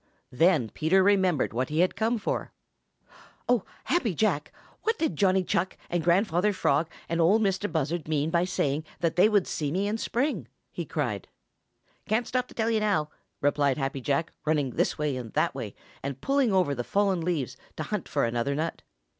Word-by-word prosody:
Then 150 -3 +3
Peter 185 +5 +3
remembered 190 - +3
what 125 +2 -1
he 155 +3 +2
had 185 - +2
come 225 +4 +1
for. 210 - -3 0.9
"Oh, 245 -5 +3 0.2
Happy 240 - 0
Jack, 165 -7 +1 0.3
what 450 +1 0
did 320 -2 0
Johnny 190 -2 +3
Chuck 180 +1 -1
and 175 -1 0
Grandfather 185 +3 +3
Frog 155 -3 +1 0.2
and 170 0 0
Ol' 180 +6 +5
Mistah 205 -2 0
Buzzard 160 0 -1
mean 155 0 0
by 170 0 +3
saying 150 -4 0 0.2
that 165 -2 +1
they 185 +4 +6
would 205 -4 +3
see 145 -2 -2
me 195 +5 0
in 215 +2 -1
the - - -7
spring?" 275 +6 -1 0.2
he - - -4
cried. - - -2 0.8
"Can't 220 +3 +1
stop 250 0 -1
to - - -16
tell 225 0 +1
you 220 - +2
now!" 190 -8 +1 0.3
replied 145 -1 +2
Happy 135 -1 -2
Jack, 145 +5 0
running 150 -4 +1
this - - 0
way 150 -2 -1
and 120 -3 -6
that - - +1
way, - - -6 0.3
and 135 -1 -4
pulling 275 - +2
over 185 -7 +2
the 120 -3 -3
fallen 195 +2 +1
leaves 160 -6 -1 0.2
to - - -2
hunt - - -4
for - - +1
another 120 +4 -1
nut. 160 +3 -2
175 Hz, 190 wpm, -27 LUFS, 145-205 Hz, 0.9 s, they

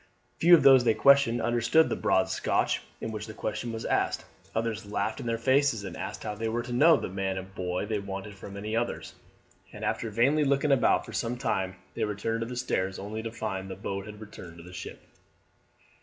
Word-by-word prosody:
Few 175 +1 +8
of 155 - +2
those 135 -2 +8
they 115 -2 +3
questioned 140 -4 +5
understood 120 +7 +3
the - - -1
broad 95 - +2
Scotch - - 0 0.2
in 115 - -3
which 105 0 -5
the 110 - -9
question 115 +2 -3
was 115 -1 -5
asked, - - 0 0.3
others 110 -2 -2
laughed 105 +1 -2
in - - -5
their 115 0 0
faces 130 -2 +2
and 95 -4 -6
asked - - -6
how 105 - -3
they 110 +2 -3
were 120 +1 -1
to 120 0 -6
know 155 +6 +6
the - - -4
man 95 0 -2
and 95 +1 -7
boy 90 +1 -2
they 105 0 -1
wanted 100 +1 -6
from 100 0 -10
any 105 +2 -3
others; 120 +1 -2 0.6
and - - -6
after 115 - -1
vainly 130 +8 +3
looking 140 +1 +2
about 135 -3 +3
for - - -10
some 120 +1 -2
time 95 -7 -1 0.2
they 115 - -2
returned 110 +2 -2
to 115 - -3
the 125 0 -6
stairs, 95 -6 -1
only 105 +3 -5
to 115 0 -5
find 95 -4 -4
that 95 - -5
the - - -19
boat 100 +1 -4
had 105 0 -9
returned 90 -6 -10
to 85 - -11
the 90 +1 -12
ship. - - -8
110 Hz, 225 wpm, -28 LUFS, 100-120 Hz, 0.6 s, Few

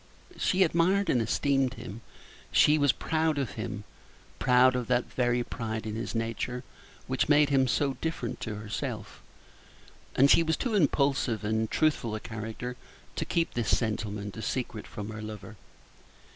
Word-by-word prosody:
She 190 0 +3
admired 185 +4 +2
and 120 - +2
esteemed 135 +3 +1
him; 115 -1 -8 0.5
she 150 +1 +5
was 145 -2 +5
proud 160 -1 0
of 135 -4 -1
him 110 -1 -5 0.6
proud 125 0 +5
of 125 -2 -2
that 125 -1 0
very 120 -1 +1
pride 110 -2 -4
in 110 - -3
his 115 +2 -4
nature 115 +2 -2 0.4
which 130 +2 0
made 145 -1 +5
him 135 -2 +3
so 140 +2 +1
different 160 -8 -3
to 110 - -4
herself, 105 0 -5 0.9
and 140 +2 +6
she - - +7
was 160 -1 +1
too 245 - -2
impulsive 140 - +2
and 110 +1 0
truthful 150 -8 +1
a - - -3
creature 110 +3 -6 0.4
to - - -2
keep 165 -1 0
this 120 -2 +2
sentiment 105 -2 -3
a 110 - -6
secret 115 -1 -3
from 105 0 -6
her 110 0 -7
lover. 110 0 -8
125 Hz, 160 wpm, -29 LUFS, 110-145 Hz, 0.9 s, she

